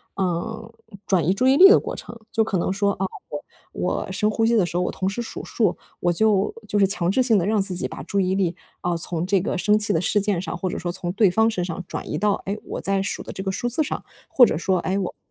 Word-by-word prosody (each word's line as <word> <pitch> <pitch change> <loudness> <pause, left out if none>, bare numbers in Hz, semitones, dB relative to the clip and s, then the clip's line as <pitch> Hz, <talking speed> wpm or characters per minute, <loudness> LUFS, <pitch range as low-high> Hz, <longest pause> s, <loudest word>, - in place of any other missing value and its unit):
呃， 220 +5 -3 0.3
转 180 -6 +2
移 180 - +3
注 255 +6 +1
意 265 - +5
力 385 +5 +9
的 435 - +7
过 - - -5
程。 235 - -9
就 225 - +3
可 195 - -1
能 175 - 0
说 200 0 +1
啊， 190 - -2 0.2
我 145 - -4 0.3
我 180 +1 -2
深 210 +3 +1
呼 225 +1 +1
吸 235 +1 +3
的 200 - +4
时 175 - -6
候， 180 - +1
我 - - -1
同 190 - -3
时 205 +5 -4
数 235 - -7
数， 210 -7 0 0.2
我 175 - +1
就 210 +1 +2
就 205 - 0
是 195 - +5
强 185 -2 0
制 260 - +2
性 235 -4 +4
地 175 - +1
让 210 0 +2
自 190 -2 -2
己 - - -1
把 - - -8
注 200 - -1
意 185 -1 +1
力 180 -3 0 0.3
啊， 175 -1 0
从 170 0 -2
这 195 +1 +2
个 190 - -2
生 210 +3 +3
气 215 - +1
的 160 - +1
事 205 - +2
件 200 -4 0
上， 180 -1 -5
或 185 +1 -2
者 - - -4
说 175 0 -3
从 175 -1 -3
对 200 -1 +4
方 220 +4 +3
身 180 -5 -2
上 175 +1 -5
转 - - -6
移 - - -2
到， 210 -1 +2
哎， 200 +2 -2
我 - - -6
在 195 0 +1
数 195 - -3
的 - - -8
这 190 - -5
个 190 - -1
数 240 +5 -2
字 280 +6 +1
上。 - - -4 0.3
或 250 - +7
者 155 - -1
说 185 +2 +1
哎 185 +3 -1
我 190 -3 -3
195 Hz, 305 characters per minute, -23 LUFS, 180-215 Hz, 0.3 s, 力